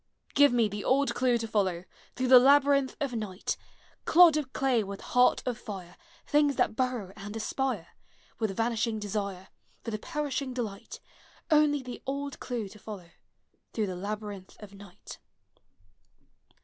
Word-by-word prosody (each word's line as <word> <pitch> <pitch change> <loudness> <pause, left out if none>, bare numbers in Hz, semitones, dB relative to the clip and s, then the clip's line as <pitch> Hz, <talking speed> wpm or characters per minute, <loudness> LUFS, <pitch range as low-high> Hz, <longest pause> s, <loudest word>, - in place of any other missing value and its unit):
Give 285 -1 +6
me 235 -2 +3
the 205 0 -6
old 275 +2 +2
clue 250 -2 +2
to 225 -1 -4
follow, 190 -5 0 0.3
Through 255 0 -1
the 255 -1 +10
labyrinth 280 0 +4
of 280 -4 -2
night! 210 -4 -3 0.5
Clod 340 -2 +7
of 295 -4 -2
clay 260 -5 +1
with 200 0 -7
heart 250 0 +3
of 245 -2 -3
tire, 190 -5 -8 0.3
Things 290 -2 +3
that - - +1
burrow 245 -7 -2
and 205 +1 -8
aspire, 225 -3 -2 0.5
With 220 - +1
the 195 - -6
vanishing 225 0 0
desire. 200 -2 -4 0.3
For 230 - -4
the 215 - -3
perishing 285 -3 -3
delight, 215 -6 -5 0.3
— - - -25
Only 295 -2 +4
the 250 -1 -8
old 280 +1 -4
clue 235 -5 -4
to 210 +2 -14
follow, 190 -6 -9 0.6
Through 220 - 0
the 185 -2 -4
labyrinth 205 0 -6
of 205 -2 -12
night! 200 -2 -12
230 Hz, 160 wpm, -29 LUFS, 205-270 Hz, 0.6 s, the